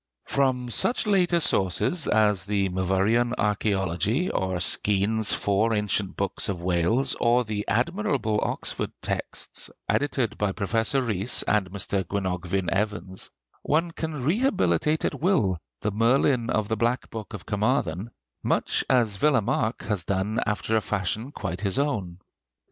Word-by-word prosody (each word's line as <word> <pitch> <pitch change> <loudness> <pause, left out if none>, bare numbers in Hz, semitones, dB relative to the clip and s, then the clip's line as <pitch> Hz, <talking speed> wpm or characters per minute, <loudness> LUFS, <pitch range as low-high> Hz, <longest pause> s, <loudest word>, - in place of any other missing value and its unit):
From 130 -3 0
such 235 - +2
later 180 -4 +3
sources 140 - +1
as 105 -2 +2
the 100 -1 0
'Myvyrian 95 +6 +1
Archæology,' 105 - 0
or 95 -1 -1
Skene's 105 +4 +2
'Four 105 +3 +1
Ancient 100 -2 -1
Books 100 +1 -1
of 95 -3 -2
Wales,' 90 +10 +1
or 120 +1 +4
the 105 -2 -4
admirable 130 - 0
Oxford - - -2
texts - - -3 0.2
edited 135 -5 0
by 105 -2 0
Professor 115 +6 0
Rhys 110 0 +1
and 105 -3 +1
Mr. 100 0 -2
Gwenogfvyn 95 -1 -2
Evans, 95 -2 -3 0.3
one 165 +3 +1
can 160 -5 -4
rehabilitate 155 - +1
at - - -3
will 110 - +2 0.2
the 105 - -1
Merlin 120 +3 +2
of 110 -3 0
the 110 +1 -1
'Black 120 +3 -1
Book 110 -1 -6
of 95 - -10
Carmarthen,' 105 - 0 0.3
much - - 0
as 115 -6 +2
Villemarqué 125 -5 +1
has 105 -5 -1
done 100 +4 -1
after 110 +1 -1
a 110 - +3
fashion 105 +6 -2
quite 95 -8 -5
his 100 +2 -1
own. 105 -12 -1
105 Hz, 135 wpm, -25 LUFS, 95-125 Hz, 0.3 s, or